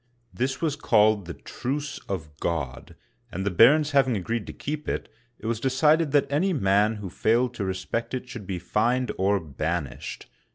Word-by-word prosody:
This 130 +2 -2
was 155 -3 +1
called 110 - +3
the 85 - -5
'* - - -21
Truce 140 +3 -3
of 80 -6 -4
God,'* 70 -7 -3 0.4
and 95 +2 -4
the 100 - +1
barons 145 - +6
hav 140 -2 +4
ing 115 - +1
agreed 110 +4 -3
to - - -5
keep 150 +1 -4
it, - - -2 0.3
it - - -13
was 115 -1 -1
decided 150 +4 +3
that 145 -1 +4
any 180 +7 +2
man 105 - +3
who 105 -2 -6
failed 120 +5 +2
to 105 -5 -3
respect 95 +7 -3
it 125 0 -5
should 115 -6 -8
be 95 - -2
fined 120 +7 0
or 100 +1 +3
banished. 75 -2 -4
115 Hz, 190 wpm, -26 LUFS, 95-135 Hz, 0.4 s, barons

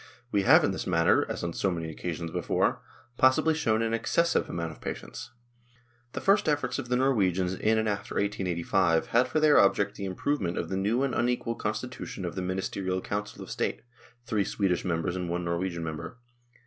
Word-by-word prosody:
We 100 - +2
have 95 - +6
in - - +2
this 95 - -4
matter, 85 -2 +3
as - - -4
on 85 -1 -2
so 95 - 0
many 85 -3 -3
occasions 85 0 -5
before, - - 0 0.4
possibly 130 +5 +4
shown 115 -8 +1
an 115 0 -1
excessive 170 +8 +1
amount 85 -1 -3
of 75 - -14
patience. - - -6 0.8
The - - -4
first 195 -4 +3
efforts 145 -1 0
of 120 -3 -6
the 125 - +2
Norwegians 95 -9 +2
in 110 +3 +1
and 110 0 +1
after 100 -1 -3
1885 90 -3 +1
had 120 +2 +3
for 145 +5 0
their 155 -1 +6
object 100 +1 +3
the 100 - -4
improvement 95 -1 -1
of - - -3
the 95 - -2
new 105 +7 +1
and 135 - 0
unequal 120 -1 0
constitution 110 -3 -4
of 85 - -4
the 95 - -4
Ministerial 95 0 -2
Council 100 +2 -4
of - - -10
State - - -2 0.4
(three 110 -4 +1
Swedish 95 -3 0
members 85 0 -1
and 90 -2 -3
one 90 0 -2
Norwegian 85 0 -2
member). 80 +8 -6
100 Hz, 190 wpm, -28 LUFS, 90-120 Hz, 0.8 s, have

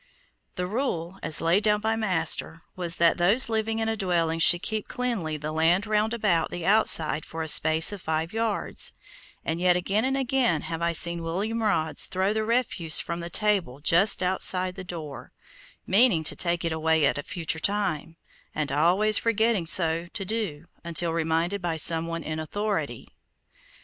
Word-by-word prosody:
The 180 - -2
rule, 190 -5 -3
as 155 - 0
laid 170 +5 +3
down 210 -1 +2
by 220 +1 -1
my 220 -1 -2
master, 165 -2 -1
was 175 -2 -2
that 170 +1 +3
those 205 +9 +2
living 220 0 -1
in 225 0 -1
a 225 - 0
dwelling 170 -5 0
should 175 +2 +5
keep 215 -1 -3
cleanly 215 -12 -3
the 150 +1 -5
land 165 +5 +2
roundabout 215 -4 0
the 175 -1 -6
outside 165 -7 +3
for 160 0 -6
a - - -5
space 160 +3 +4
of 205 -3 -7
five 160 +2 -2
yards, 225 -2 -1 0.5
and 165 +1 -2
yet 180 0 +3
again 195 +4 0
and 265 +1 0
again 255 - +1
have 165 0 -5
I 170 0 +1
seen 170 +1 +2
William 200 +8 -3
Rods 160 -8 0
throw 190 +2 0
the 220 0 -1
refuse 215 -8 0
from 170 0 -4
the 170 0 -6
table 190 - 0
just 175 +6 +3
outside 185 0 +1
the 190 0 -8
door, 160 -6 -8 0.5
meaning 195 -4 +3
to 155 - 0
take 170 -1 -1
it 165 - -1
away 160 -1 +1
at 140 - +1
a - - -2
future 165 0 -3
time, 185 -5 -2 0.4
and 150 -2 -2
always 180 +9 +3
forgetting 225 -5 +1
so 165 0 +1
to 195 +2 -5
do 185 -8 -3 0.2
until 170 0 -1
reminded 165 +4 -1
by 170 -2 -2
some 165 +1 +1
one 165 -1 -4
in 155 0 -4
authority. 205 +7 -3
175 Hz, 180 wpm, -26 LUFS, 165-210 Hz, 0.5 s, should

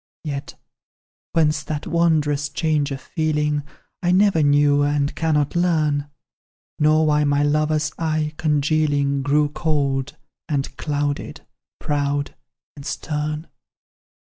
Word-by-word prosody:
"Yet 140 -2 -5 0.8
whence 155 -2 +2
that 150 -1 -5
wondrous 150 -4 +1
change 150 -1 0
of 135 -1 -4
feeling, 150 -2 -1 0.4
I 175 -1 +2
never 190 -3 +4
knew, 145 0 +4
and 145 0 +1
cannot 150 -3 0
learn; 155 -5 +1 0.7
Nor 155 +1 +4
why 150 -1 +3
my 145 0 +2
lover's 155 +1 +1
eye, 155 -2 -1
congealing, 145 -2 +1
Grew 145 +2 +2
cold 140 -4 -1 0.3
and 140 -2 -2
clouded, 145 +1 -3 0.3
proud 145 -1 -1 0.4
and 140 - -10
stern. 150 +2 -3
150 Hz, 110 wpm, -22 LUFS, 145-155 Hz, 0.8 s, never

